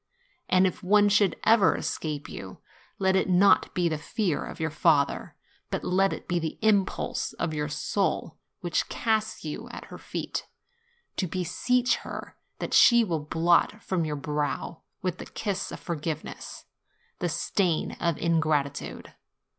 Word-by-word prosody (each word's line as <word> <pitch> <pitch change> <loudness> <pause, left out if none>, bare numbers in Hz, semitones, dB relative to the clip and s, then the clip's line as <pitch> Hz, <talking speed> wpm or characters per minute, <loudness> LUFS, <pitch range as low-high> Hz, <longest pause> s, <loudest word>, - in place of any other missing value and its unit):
And 185 +1 +5
if 185 +3 -1
one 205 +2 +5
should 200 -3 +3
ever 220 -3 +5
es - - -2
cape 150 -2 -4
you, 95 -1 -8 0.4
let 190 0 +2
it 190 - +2
not 185 +2 +5
be 175 -1 +2
the 155 -2 -1
fear 190 0 -1
of - - -8
your 160 -1 -1
father, 150 -2 +2 0.3
but - - -3
let 190 +2 +2
it - - -6
be 175 -1 +1
the 160 -1 -4
impulse 205 -3 +1
of 165 -2 -2
your 150 0 -2
soul, 165 -1 -1 0.2
which 175 -2 -1
casts 220 -5 -1
you 150 - -5
at - - -8
her - - -8
feet, - - -4 0.7
to 185 - 0
beseech 215 +9 +1
her - - -8 0.2
that - - -4
she 235 -1 +7
will 170 -7 -1
blot 170 +7 +2
from 185 -3 0
your 155 -1 -2
brow, 150 +2 -3 0.2
with 185 -2 -2
the - - -7
kiss 200 -3 -3
of - - -7
forgiveness, 155 -2 -5 0.5
the 175 - 0
stain 170 +1 0
of 170 -3 0
ingratitude. 155 -4 -1
175 Hz, 155 wpm, -27 LUFS, 155-195 Hz, 0.7 s, she